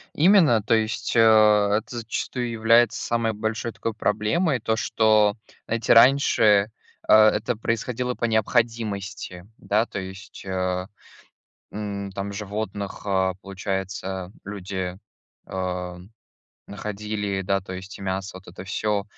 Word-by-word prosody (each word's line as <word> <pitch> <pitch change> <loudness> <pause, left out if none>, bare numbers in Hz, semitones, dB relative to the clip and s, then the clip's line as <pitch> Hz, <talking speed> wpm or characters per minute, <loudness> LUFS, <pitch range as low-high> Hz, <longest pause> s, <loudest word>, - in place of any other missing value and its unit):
Именно. 160 - +5
То 110 - +2
есть, 110 +1 -1
а, 105 -2 +5
это 120 +2 -10
зачастую 120 +2 -3
является 115 0 +3
самой 115 -1 0
большой 110 +2 -3
такой 115 0 -4
проблемой. 110 - 0
То, 110 0 0
что, 110 -2 +3 0.3
знаете, 115 +1 +2
раньше, 115 -5 +5 0.4
а, 110 0 +7
это 115 +3 -1
происходило 120 +3 -2
по 120 - -2
необходимости, 110 -4 -1
да. 105 +3 +1
То - - -5
есть, 95 0 -9
ам, 95 +1 -3 1.1
там 100 +1 -4
животных, 100 -1 -5
а, 95 -2 +1
получается, 95 -1 -4
люди, 95 -2 -5 0.5
ам, 90 0 -5 0.6
находили, 105 -1 -4
да- 100 +1 0
то 95 -1 -9
есть 95 +2 -8
и - - -10
мясо, 95 0 -3
и - - -7
вот 95 - -19
это 90 +1 -9
всё, 100 +1 -1
105 Hz, 125 wpm, -24 LUFS, 95-115 Hz, 1.1 s, а